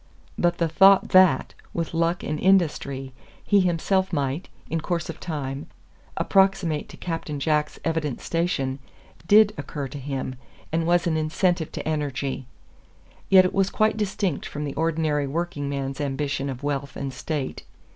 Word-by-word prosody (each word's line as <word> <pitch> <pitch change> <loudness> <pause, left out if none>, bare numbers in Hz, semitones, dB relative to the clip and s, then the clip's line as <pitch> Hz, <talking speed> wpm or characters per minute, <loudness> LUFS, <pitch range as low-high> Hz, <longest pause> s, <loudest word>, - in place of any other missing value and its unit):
But 175 0 +1
the 170 - +1
thought 195 +4 +6
that, 185 -8 +5 0.2
with 165 -1 -2
luck 170 +2 0
and 150 0 -2
industry, 145 -8 +1 0.3
he 205 - +4
himself 185 +2 +1
might, 145 +2 -2 0.2
in 165 0 -2
course 170 0 -2
of 160 - -13
time, 145 -4 -4 0.5
approximate 190 -6 +2
to - - -11
Captain 165 -4 -4
Jack's 150 +1 0
evident 160 -5 -1
station, 140 -6 -1 0.5
DID 210 +1 +6
occur 145 -3 -4
to 145 - -7
him, 130 -1 -4 0.3
and 165 +1 0
was 175 0 +3
an 165 -2 +1
incentive 160 +2 0
to - - -5
energy. 140 -4 -2 0.8
Yet 190 -1 +8
it 185 - -1
was 195 0 +2
quite 215 0 +2
distinct 195 -6 -1
from 150 - -5
the 140 - -4
ordinary 155 -2 0
working 145 -1 -3
man's 135 0 -3
ambition 140 0 -2
of 130 +1 -6
wealth 140 -1 -2
and 135 -1 -4
state. 140 +1 -4
155 Hz, 155 wpm, -25 LUFS, 140-175 Hz, 0.8 s, Yet